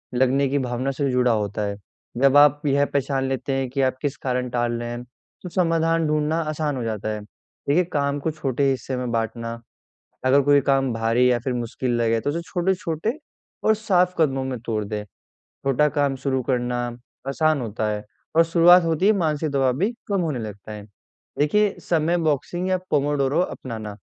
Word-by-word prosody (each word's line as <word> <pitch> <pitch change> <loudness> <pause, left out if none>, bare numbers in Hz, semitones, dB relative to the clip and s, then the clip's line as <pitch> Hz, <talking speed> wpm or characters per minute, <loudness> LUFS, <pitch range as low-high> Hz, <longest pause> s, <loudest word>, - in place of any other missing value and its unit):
लगने 130 +2 +3
की 140 +1 +1
भावना 125 +1 -2
से 140 0 -1
जुड़ा 125 -1 +3
होता 105 -1 -1
है। 100 - -4 0.4
जब 140 +1 +5
आप 145 0 +6
यह 140 +1 +3
पहचान 135 -1 -1
लेते 135 +1 -2
हैं 135 -1 -1
की 135 +1 -1
आप 130 0 +1
किस 145 -1 -1
कारण 125 -1 -2
टाल 120 -1 0
रहे 120 - -4
हैं, 120 +1 -5 0.4
तो 180 - -5
समाधान 165 -2 +1
ढूँढना 150 +1 +1
आसान 150 -2 -2
हो 125 - -3
जाता 110 -1 -3
है। 105 -1 -3
देखिए 140 +9 -2
काम 140 0 0
को 160 +3 -2
छोटे 140 -3 -2
हिस्से 130 0 -2
में 125 -2 -3
बाँटना, 115 0 -3 0.7
अगर 135 +2 +5
कोई 145 0 +4
काम 135 -1 +2
भारी 115 +3 +2
या 120 - +2
फिर 130 +2 -3
मुश्किल 120 +1 -3
लगे, 115 -1 +2
तो 145 - -1
उसे 165 +3 -2
छोटे-छोटे 180 +2 -1 0.5
और 220 - +4
साफ़ 185 -4 +2
कदमों 135 -4 +2
में 130 -3 -4
तोड़ 110 -2 -1
दे। 105 0 -4 0.4
छोटा 135 +2 0
काम 145 -2 0
शुरू 130 0 -1
करना 125 -1 -1 0.5
आसान 155 0 +1
होता 110 -1 -2
है 105 0 -3 0.3
और 165 - +7
शुरुआत 175 +2 +6
होते 165 +3 0
हीं 215 - +6
मानसिक 155 -5 0
दबाव 135 -2 +2
भी 200 +8 +1 0.2
कम 200 -3 0
होने 150 -7 -2
लगता 105 -1 -8
है। 105 -1 -7 0.6
देखिए 205 +8 +2
समय 170 +1 +2
बॉक्सिंग 170 +4 -1
या 185 - +2
पोमोडोरो 145 0 +1
अपनाना, 110 - -5
135 Hz, 185 wpm, -23 LUFS, 120-155 Hz, 0.7 s, और